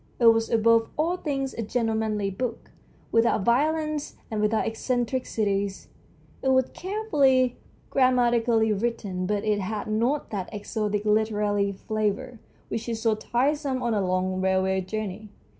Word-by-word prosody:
It 240 - +2
was 225 0 +5
above 230 0 +3
all 330 +4 +1
things 275 -5 -2
a - - -4
gentlemanly 220 -3 -1
book, 235 +4 -4 0.4
without 230 -3 +2
violence 305 +4 +1 0.2
and 215 -1 -1
without 215 +1 +1
eccentricities. 225 -4 -1 0.5
It - - -2
was 260 -1 +3
carefully 350 -10 +2
and 250 - 0 0.4
grammatically 240 -4 +3
written; 200 -4 -2
but 205 0 -1
it 210 -1 +1
had 205 +2 -3
not 235 +7 0
that 195 -4 -4
exotic 210 0 -2
literary 210 -1 +1
flavour 215 +4 -2 0.3
which 230 +1 -3
is 225 -1 -2
so 225 -1 +2
tiresome 265 +4 0
on 235 -1 +1
a 205 - +1
long 185 0 0
railway 190 0 +1
journey. 210 +1 -5
225 Hz, 140 wpm, -26 LUFS, 205-255 Hz, 0.5 s, was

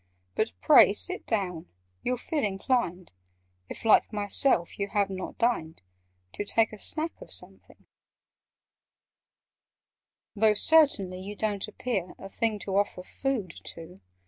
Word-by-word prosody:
But 220 - -1
pray 285 -9 +7
sit 365 - -3
down: 180 -7 -2 0.3
you'll 250 0 -1
feel 295 +4 -2
inclined 195 - -1 0.6
(If, - - -9
like 220 - +5
myself, 205 -2 0
you 200 - -1
have 200 -1 0
not 185 -1 -6
dined) 165 -10 0 0.5
To - - -3
take 220 +1 +1
a 215 - -9
snack 320 +8 0
of - - -11
something: - - -9 2.5
"Though, 215 0 +4
certainly, 210 - +3
you 200 +2 -7
don't 205 -2 -2
appear 215 -4 -3
A 195 - -9
thing 220 +1 -1
to 195 -1 -1
offer 200 -2 0
food 235 -4 -3
to! 165 - -6
205 Hz, 130 wpm, -28 LUFS, 190-240 Hz, 2.5 s, pray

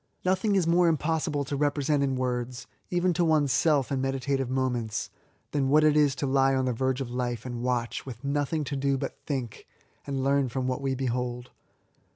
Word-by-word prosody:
Nothing 190 +3 +2
is 185 -4 +3
more 170 +1 +4
impossible 155 -2 0
to 140 - -3
represent 145 0 +1
in 135 -1 +1
words, 125 0 -2 0.2
even 175 0 +1
to 175 - +1
one's 155 -4 +3
self 145 0 +2
in 135 -1 0
meditative 135 0 -1
moments, 125 -4 -1 0.4
than 140 -2 +1
what 155 +2 +5
it 155 -1 +4
is 145 -2 +4
to 140 - -2
lie 135 0 +3
on 130 0 +1
the 125 - 0
verge 130 +2 -1
of 125 -3 -4
life 120 -2 -3
and 120 -2 -4
watch, 120 -2 -1
with 120 -3 -9
nothing 145 +2 0
to 145 0 -4
do 135 0 +1
but - - -2
to - - -36
think, 130 -6 -4 0.4
and 135 -2 -2
learn 140 -1 +2
from 130 +1 -2
what 130 +1 -1
we 135 -1 -1
behold. 125 -1 -3
135 Hz, 200 wpm, -27 LUFS, 125-145 Hz, 0.4 s, what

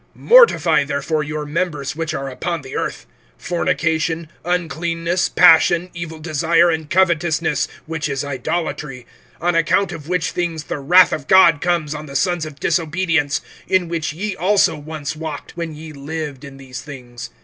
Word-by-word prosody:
(5)Mortify 175 - +5
therefore 145 +2 -1
your 150 0 -4
members 150 -3 -2
which 165 0 -3
are 135 -3 -4
upon 155 +4 -4
the 130 - -8
earth; - - -3 0.3
fornication, 165 -2 -1
uncleanness, 170 0 -1
passion, 175 +1 +5
evil 170 -2 -6
desire, 165 +2 +2
and 160 -2 -3
covetousness, 170 -4 +1 0.2
which 160 -1 -3
is 140 0 -2
idolatry; 140 -1 -4 0.3
(6)on 175 0 0
account 170 +3 +2
of 160 -3 -8
which 180 -1 0
things 170 -3 -3
the 145 - -5
wrath 175 +5 +5
of 145 -2 -4
God 180 -5 +6
comes 170 -4 0
on 155 0 -7
the 140 - -10
sons 175 -3 0
of 145 -2 -12
disobedience; 165 -2 0 0.3
(7)in 185 -3 +2
which 165 -3 -2
ye 190 +6 -4
also 195 -2 +2
once 150 -1 -6
walked, 155 -2 -7
when 165 -2 -5
ye 155 0 -10
lived 145 -1 -6
in 140 -1 -10
these 130 -1 -8
things. 125 -5 -9
160 Hz, 160 wpm, -19 LUFS, 150-175 Hz, 0.3 s, God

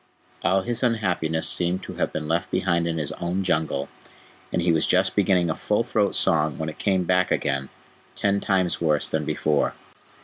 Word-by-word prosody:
All 95 0 +2
his 120 -1 -3
unhappiness 90 -10 0
seemed 90 +1 +2
to - - -7
have - - -1
been 75 -1 -4
left 85 +4 -1
behind 85 -2 0
in 85 -1 -2
his 75 -2 -2
own 90 +3 -3
Jungle, 80 -5 -1 0.6
and - - 0
he 85 0 +2
was 80 -1 +2
just 95 +1 +2
beginning 95 -3 +3
a 80 - 0
full 105 +2 0
throat 110 -4 0
song 75 -3 +2
when 80 0 -3
it 75 - -10
came 95 -3 +1
back 90 +1 +2
again 70 -1 -1 0.5
ten 100 0 +1
times 95 -4 0
worse 75 -3 +2
than - - -2
before. 75 -2 0
85 Hz, 190 wpm, -24 LUFS, 80-95 Hz, 0.6 s, beginning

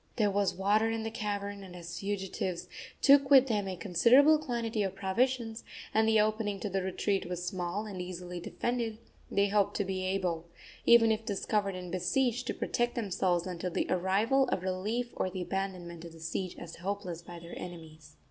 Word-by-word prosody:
There 210 -3 +2
was 200 -1 +1
water 205 +4 +2
in 225 0 -2
the 225 - -3
cavern, 205 -2 -3
and 185 -2 -10
as 175 -1 -8
the - - -5
fugitives 190 -3 -3 0.4
took 280 -1 +7
with 270 -2 +8
them 210 -6 0
a 190 - -3
considerable 245 - +5
quantity 230 -6 -2
of 195 -1 -1
provisions, 225 +4 0 0.3
and 220 +1 +4
the 220 -1 +5
opening 210 -1 +1
to 205 - -3
the 195 +1 0
retreat 190 0 -1
was 180 0 -3
small 185 +2 -2
and 195 -4 -5
easily 180 0 -6
defended, 230 +4 -2 0.3
they 200 0 +2
hoped 205 -1 +2
to 205 - 0
be 185 0 -2
able, 180 -3 -1 0.4
even 230 -1 +7
if 220 0 0
discovered 200 -1 -1
and 180 -1 -6
besieged, 240 +7 0
to - - 0
protect 240 0 -1
themselves 185 -6 0
until 180 -1 -3
the - - -1
arrival 205 +9 +2
of 185 - -1
relief 210 +6 -2
or 185 - 0
the 185 0 -4
abandonment 180 -3 -4
of 170 -1 -9
the 165 - -13
siege 170 +3 -3
as 170 -1 -9
hopeless 185 -2 -4
by 175 0 -10
their 170 0 -10
enemies. 160 -3 -10
195 Hz, 190 wpm, -31 LUFS, 180-220 Hz, 0.4 s, with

